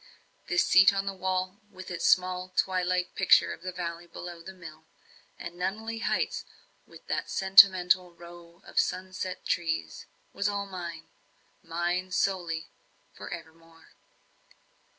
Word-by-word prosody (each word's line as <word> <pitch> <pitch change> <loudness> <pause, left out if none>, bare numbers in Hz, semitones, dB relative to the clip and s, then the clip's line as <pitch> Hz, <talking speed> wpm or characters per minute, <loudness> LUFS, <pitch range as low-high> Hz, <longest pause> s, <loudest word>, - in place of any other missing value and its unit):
This 355 0 +2
seat 195 +1 +7
on 195 0 -2
the 195 - -2
wall, 185 +1 -2
with 185 -2 -10
its 175 - -1
small 185 0 +2
twilight 180 -1 +1
picture 190 - +4
of - - -12
the 185 +1 -5
valley 175 -1 -5
below 170 0 -9
the 190 - -9
mill, 160 -4 -12 0.5
and 170 - -7
Nunneley 215 +6 -4
heights, - - -1 0.4
with - - -16
that - - -3
sentinel 185 -2 +6
row 170 +1 -14
of - - -1
sun 185 0 -1
set 185 0 -5
trees 160 - -2 0.3
was 200 +1 0
all 200 0 -2
mine 170 -4 -7 0.5
mine 175 +2 -2
solely 175 -4 -1 0.4
for - - -9
evermore. 165 0 -11
180 Hz, 135 wpm, -28 LUFS, 170-190 Hz, 0.5 s, seat